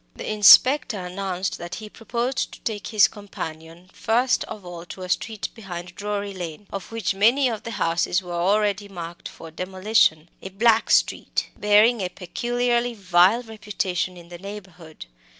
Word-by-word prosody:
The -, -, -5 dB
inspector 235 Hz, +4 st, +6 dB
announced 185 Hz, 0 st, -4 dB
that 175 Hz, 0 st, -6 dB
he 215 Hz, -, -8 dB
proposed 240 Hz, +4 st, -3 dB
to -, -, -13 dB
take 215 Hz, -4 st, -4 dB
his 215 Hz, -3 st, +5 dB
companion 165 Hz, -4 st, -9 dB
first 245 Hz, +3 st, +1 dB
of 205 Hz, -4 st, -9 dB
all 175 Hz, -1 st, -8 dB
to 185 Hz, -, -8 dB
a 180 Hz, -, -7 dB
street 215 Hz, +2 st, -2 dB
behind 180 Hz, -5 st, -8 dB
Drury 205 Hz, 0 st, -4 dB
Lane, 175 Hz, +1 st, -7 dB
of 195 Hz, +1 st, -6 dB
which 225 Hz, -5 st, -1 dB
many 235 Hz, +8 st, +3 dB
of 225 Hz, -4 st, -3 dB
the -, -, -7 dB
houses 175 Hz, -2 st, 0 dB
were 175 Hz, -1 st, -7 dB
already 205 Hz, +3 st, +1 dB
marked 170 Hz, -2 st, -8 dB
for 165 Hz, -, -12 dB
demolition 185 Hz, -2 st, +1 dB
a 190 Hz, -, -7 dB
"black 220 Hz, +3 st, +3 dB
street," -, -, +1 dB
bearing 210 Hz, +2 st, +4 dB
a 185 Hz, -, -2 dB
peculiarly 240 Hz, +5 st, -1 dB
vile 190 Hz, +3 st, +3 dB
reputation 195 Hz, -4 st, -3 dB
in 170 Hz, -1 st, -14 dB
the 175 Hz, -1 st, -10 dB
neighbourhood. 185 Hz, -, -10 dB
200 Hz, 160 wpm, -23 LUFS, 180-220 Hz, -, inspector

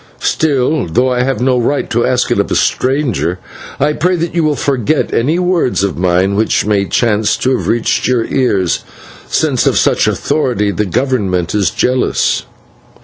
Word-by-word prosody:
Still, 145 Hz, -, 0 dB
though 125 Hz, +10 st, +1 dB
I 125 Hz, 0 st, 0 dB
have 130 Hz, -1 st, -1 dB
no 125 Hz, 0 st, +2 dB
right 140 Hz, +4 st, -1 dB
to 120 Hz, 0 st, +1 dB
ask 125 Hz, -1 st, 0 dB
it -, -, +1 dB
of -, -, 0 dB
a -, -, -1 dB
stranger, 130 Hz, -, 0 dB, 0.4 s
I 150 Hz, -, +1 dB
pray 180 Hz, +4 st, +1 dB
that 170 Hz, -1 st, -3 dB
you 170 Hz, -1 st, +1 dB
will 150 Hz, -1 st, +1 dB
forget 140 Hz, +1 st, -1 dB
any 145 Hz, +8 st, +1 dB
words 180 Hz, -, 0 dB
of 100 Hz, -3 st, -1 dB
mine 90 Hz, +2 st, +1 dB
which 110 Hz, 0 st, +1 dB
may 100 Hz, -2 st, +1 dB
chance 105 Hz, +2 st, +1 dB
to 130 Hz, 0 st, +1 dB
have -, -, -4 dB
reached 115 Hz, -1 st, 0 dB
your 125 Hz, -3 st, +1 dB
ears, 100 Hz, -10 st, 0 dB, 0.5 s
since -, -, +1 dB
of -, -, +2 dB
such -, -, +2 dB
authority 125 Hz, -9 st, 0 dB
the 105 Hz, +1 st, -1 dB
Government 100 Hz, -7 st, -1 dB
is 100 Hz, -4 st, +1 dB
jealous." 125 Hz, +6 st, 0 dB
125 Hz, 175 wpm, -14 LUFS, 105-140 Hz, 0.5 s, no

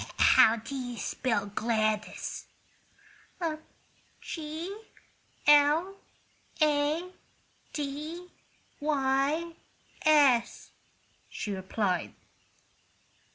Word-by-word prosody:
"How 220 Hz, -, +6 dB
do 225 Hz, +4 st, -8 dB
you 245 Hz, -3 st, -5 dB
spell 225 Hz, -5 st, -1 dB
Gladys?" 215 Hz, 0 st, -2 dB, 1.7 s
"G 325 Hz, +4 st, -6 dB, 0.7 s
l 295 Hz, +6 st, +5 dB, 0.6 s
a 305 Hz, +3 st, +1 dB, 0.6 s
d 305 Hz, +5 st, -5 dB, 0.5 s
y 290 Hz, +3 st, +1 dB, 0.5 s
s," 280 Hz, -6 st, +3 dB, 0.6 s
she 210 Hz, -, -5 dB
replied. 190 Hz, -1 st, -2 dB
285 Hz, 60 wpm, -29 LUFS, 230-310 Hz, 1.7 s, How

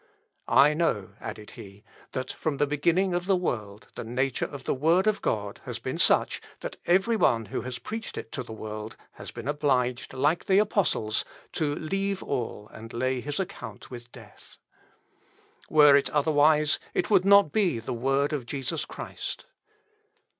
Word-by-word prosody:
I 150 Hz, +2 st, +6 dB
know," 115 Hz, -, 0 dB
added 105 Hz, -, -8 dB
he, 100 Hz, +1 st, -12 dB, 0.3 s
"that 130 Hz, 0 st, -3 dB
from 155 Hz, -3 st, -2 dB
the 145 Hz, -, +3 dB
beginning 170 Hz, +6 st, +1 dB
of 175 Hz, +1 st, -2 dB
the 195 Hz, -, +4 dB
world 110 Hz, -, -3 dB
the -, -, -6 dB
nature 125 Hz, +3 st, -1 dB
of 140 Hz, -2 st, -9 dB
the -, -, 0 dB
word 165 Hz, +8 st, +3 dB
of 215 Hz, -1 st, +1 dB
God 105 Hz, -2 st, -2 dB
has -, -, -4 dB
been -, -, -4 dB
such, -, -, +3 dB, 0.2 s
that -, -, -5 dB
every 190 Hz, +6 st, +3 dB
one 115 Hz, -, +2 dB
who -, -, -1 dB
has 125 Hz, 0 st, -5 dB
preached 220 Hz, -, -6 dB
it 110 Hz, -, -6 dB
to -, -, -4 dB
the 120 Hz, -, -9 dB
world, 110 Hz, 0 st, -7 dB
has -, -, -10 dB
been 120 Hz, +1 st, -8 dB
obliged, 130 Hz, -5 st, 0 dB
like 145 Hz, +6 st, +1 dB
the 190 Hz, -, +4 dB
apostles, 200 Hz, -, +1 dB, 0.3 s
to 150 Hz, -3 st, -1 dB
leave 195 Hz, +5 st, -2 dB
all 115 Hz, -5 st, -3 dB
and 115 Hz, +1 st, -10 dB
lay 130 Hz, +1 st, -1 dB
his 145 Hz, +4 st, -4 dB
account 190 Hz, -7 st, -6 dB
with 120 Hz, -1 st, -9 dB
death. -, -, -14 dB, 1.1 s
Were 150 Hz, -2 st, +7 dB
it 140 Hz, -, +3 dB
otherwise, 150 Hz, 0 st, +3 dB, 0.2 s
it -, -, 0 dB
would 190 Hz, -3 st, +5 dB
not 200 Hz, -5 st, +6 dB
be 190 Hz, -, +2 dB
the 115 Hz, -, -4 dB
word 135 Hz, +5 st, +1 dB
of 130 Hz, -5 st, -3 dB
Jesus 145 Hz, +4 st, -2 dB
Christ." -, -, -7 dB
145 Hz, 170 wpm, -27 LUFS, 120-175 Hz, 1.1 s, Were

